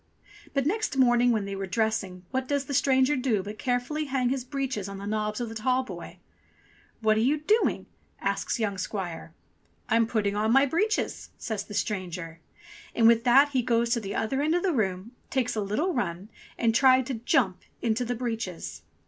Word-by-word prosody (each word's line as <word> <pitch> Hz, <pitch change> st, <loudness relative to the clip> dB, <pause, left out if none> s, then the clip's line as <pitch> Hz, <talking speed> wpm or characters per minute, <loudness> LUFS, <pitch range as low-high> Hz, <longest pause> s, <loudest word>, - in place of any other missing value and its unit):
But 275 Hz, -1 st, +1 dB
next 415 Hz, -2 st, -1 dB
morning 245 Hz, -1 st, +4 dB
when 215 Hz, -3 st, 0 dB
they 200 Hz, 0 st, -4 dB
were 195 Hz, 0 st, -4 dB
dressing 195 Hz, -3 st, -1 dB
what 260 Hz, 0 st, -1 dB
does 280 Hz, 0 st, 0 dB
the 280 Hz, -, -5 dB
stranger 265 Hz, +1 st, +3 dB
do 245 Hz, -7 st, 0 dB
but 210 Hz, +2 st, -8 dB
carefully 250 Hz, +5 st, -1 dB
hang 260 Hz, -3 st, 0 dB
his 260 Hz, -1 st, -1 dB
breeches 260 Hz, -7 st, -3 dB
on 195 Hz, -, -7 dB
the 200 Hz, -, -7 dB
knobs 215 Hz, +1 st, -2 dB
of 240 Hz, -, -2 dB
the 225 Hz, -, -7 dB
tallboy. 255 Hz, +3 st, -2 dB, 0.9 s
''What 215 Hz, 0 st, +4 dB
are -, -, +3 dB
you 265 Hz, +7 st, +3 dB
doing?" 420 Hz, +10 st, +1 dB, 0.3 s
asks -, -, -1 dB
young 200 Hz, -4 st, -1 dB
squire. 175 Hz, -5 st, -5 dB, 0.5 s
"I'm 230 Hz, 0 st, +3 dB
putting 205 Hz, -3 st, 0 dB
on 215 Hz, +2 st, +1 dB
my 270 Hz, +3 st, +6 dB
breeches," 415 Hz, +10 st, -1 dB
says 215 Hz, -3 st, -4 dB
the 205 Hz, -, -8 dB
stranger; 180 Hz, -5 st, -3 dB, 0.6 s
and 230 Hz, -, +3 dB
with 230 Hz, 0 st, +5 dB
that 270 Hz, +4 st, +6 dB
he 265 Hz, -3 st, +1 dB
goes 235 Hz, -1 st, +1 dB
to 235 Hz, -, +2 dB
the 200 Hz, -2 st, -5 dB
other 265 Hz, +5 st, 0 dB
end 310 Hz, +3 st, +2 dB
of 355 Hz, -, 0 dB
the 375 Hz, -3 st, +2 dB
room, 195 Hz, -3 st, -1 dB, 0.2 s
takes 255 Hz, -3 st, 0 dB
a 215 Hz, -, 0 dB
little 260 Hz, -, 0 dB
run, 190 Hz, -4 st, -3 dB, 0.3 s
and 230 Hz, -1 st, +2 dB
tried 260 Hz, +1 st, +5 dB
to 265 Hz, -, -3 dB
jump 230 Hz, -6 st, +1 dB, 0.2 s
into 230 Hz, +1 st, +1 dB
the 245 Hz, +1 st, -2 dB
breeches. 225 Hz, -7 st, -4 dB
235 Hz, 190 wpm, -27 LUFS, 205-265 Hz, 0.9 s, my